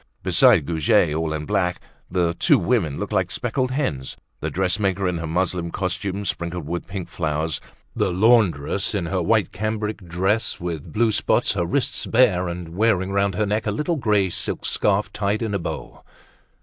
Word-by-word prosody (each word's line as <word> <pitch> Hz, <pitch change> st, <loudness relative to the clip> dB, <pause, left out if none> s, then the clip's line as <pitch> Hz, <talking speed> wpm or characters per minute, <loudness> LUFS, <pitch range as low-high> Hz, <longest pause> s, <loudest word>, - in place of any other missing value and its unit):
Beside -, -, +5 dB
Goujet, 80 Hz, -1 st, +2 dB
all 80 Hz, 0 st, -1 dB
in 75 Hz, -1 st, -3 dB
black, 90 Hz, +2 st, 0 dB, 0.3 s
the 85 Hz, -2 st, +1 dB
two -, -, +4 dB
women 90 Hz, -, 0 dB
looked 105 Hz, +1 st, -4 dB
like 95 Hz, -3 st, +2 dB
two -, -, -3 dB
speckled 125 Hz, +1 st, -1 dB
hens—the 130 Hz, -, -4 dB
dressmaker 95 Hz, +1 st, 0 dB
in 90 Hz, -2 st, -1 dB
her 85 Hz, -, -4 dB
muslin 85 Hz, +1 st, -1 dB
costume, 95 Hz, +2 st, -3 dB
sprinkled 85 Hz, -3 st, -3 dB
with 85 Hz, +2 st, -4 dB
pink 95 Hz, -2 st, -5 dB
flowers, 80 Hz, -1 st, -2 dB, 0.3 s
the 95 Hz, -, +1 dB
laundress 100 Hz, -, +2 dB
in 95 Hz, -4 st, -1 dB
her 90 Hz, +2 st, -1 dB
white 105 Hz, +4 st, +2 dB
cambric 110 Hz, +2 st, -2 dB
dress 95 Hz, +6 st, 0 dB
with 85 Hz, -4 st, -5 dB
blue 110 Hz, 0 st, +2 dB
spots, 105 Hz, -, +2 dB
her -, -, -1 dB
wrists -, -, -1 dB
bare, 105 Hz, -7 st, +3 dB
and 85 Hz, -1 st, -5 dB
wearing 100 Hz, -3 st, +2 dB
round 100 Hz, -1 st, +1 dB
her 105 Hz, -, +1 dB
neck 105 Hz, +2 st, -1 dB
a -, -, +1 dB
little 150 Hz, -, -1 dB
grey 105 Hz, -8 st, +2 dB
silk -, -, -2 dB
scarf 105 Hz, 0 st, +1 dB
tied 105 Hz, +2 st, -1 dB
in 110 Hz, -2 st, -2 dB
a 100 Hz, -, 0 dB
bow. 85 Hz, -, -6 dB
95 Hz, 175 wpm, -23 LUFS, 85-105 Hz, 0.3 s, Beside